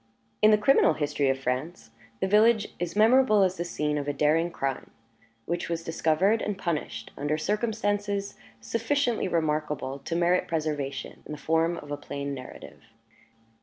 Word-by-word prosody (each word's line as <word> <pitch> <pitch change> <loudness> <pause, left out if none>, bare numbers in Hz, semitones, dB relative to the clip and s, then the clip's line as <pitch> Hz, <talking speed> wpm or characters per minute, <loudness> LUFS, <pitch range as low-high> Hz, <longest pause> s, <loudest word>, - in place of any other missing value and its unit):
In 215 - +7
the 215 - +6
criminal 210 -5 +4
history 145 -2 0
of 135 - +1
France, 130 0 -4 0.3
the - - +2
village 215 +2 +4
is 175 0 -3
memorable 220 -1 +5
as 185 0 +1
the 175 - -2
scene 150 -3 -2
of 145 - -5
a 145 - 0
daring 155 +4 +2
crime, 135 -5 -3 0.6
which 170 +1 -3
was 165 -1 -2
discovered 165 +6 +1
and 205 -2 -2
punished 170 -5 -4
under 145 +2 -1
circumstances 205 +1 -1 0.3
sufficiently 235 0 0
remarkable 150 -5 -1
to 165 - -4
merit 175 +1 +2
preservation 150 -4 -3
in - - -6
the - - -6
form 165 +3 +1
of 145 - -9
a 145 - -2
plain 140 0 -5
narrative. 130 -2 -10
165 Hz, 160 wpm, -27 LUFS, 150-205 Hz, 0.6 s, In